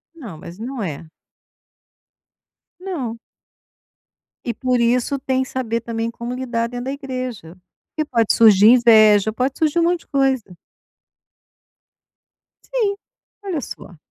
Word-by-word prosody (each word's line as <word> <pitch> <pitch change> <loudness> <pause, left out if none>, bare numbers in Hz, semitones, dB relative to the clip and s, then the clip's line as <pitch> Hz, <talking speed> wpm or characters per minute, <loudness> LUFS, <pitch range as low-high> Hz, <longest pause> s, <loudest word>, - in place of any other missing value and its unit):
Não, 230 - -9
mas 170 +3 -11
não 250 +2 -5
é. 160 -3 -6 1.7
Não. 290 -12 -5 1.3
E 235 - -2
por 250 0 0
isso 245 +4 +1
tem 260 0 -1
saber 235 -3 -3
também 230 0 -3
como 235 +1 -6
lidar 245 -2 -2
dentro 245 +1 -6
da 270 - -2
igreja, 255 - -6 0.4
porque 310 - 0
pode 230 -3 +2
surgir 215 -2 +6
inveja, 220 -4 +6
pode 255 +4 -1
surgir 315 +1 +1
um - - +3
monte 345 0 +1
de - - -23
coisa. 265 - 0 2.1
Sim, 430 -5 -1 0.5
olha 360 -7 -3
só. 180 -7 -10
245 Hz, 125 wpm, -20 LUFS, 225-270 Hz, 2.1 s, surgir